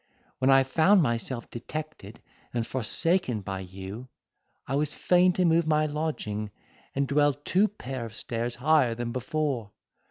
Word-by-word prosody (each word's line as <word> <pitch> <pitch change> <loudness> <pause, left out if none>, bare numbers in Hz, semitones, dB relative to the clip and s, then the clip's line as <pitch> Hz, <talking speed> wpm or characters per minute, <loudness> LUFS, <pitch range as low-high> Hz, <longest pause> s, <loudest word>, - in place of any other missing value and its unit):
When 130 - +3
I 135 0 +7
found 165 +8 +4
myself 120 -1 -2
detected 120 -4 -7 0.3
and 115 -1 0
forsaken 130 - 0
by 95 0 -4
you, 95 +6 -8 0.6
I 135 - -4
was 145 +1 0
fain 180 0 +4
to 180 0 +1
move 165 -1 +3
my 155 0 +3
lodging, 145 -9 -3 0.5
and 140 0 +1
dwell 145 +1 +3
two 180 +8 +2
pair 130 - -6
of 105 - -13
stairs 120 +1 -3
higher 130 -2 +3
than 120 0 -3
before. 130 -4 -2
135 Hz, 150 wpm, -27 LUFS, 115-155 Hz, 0.6 s, I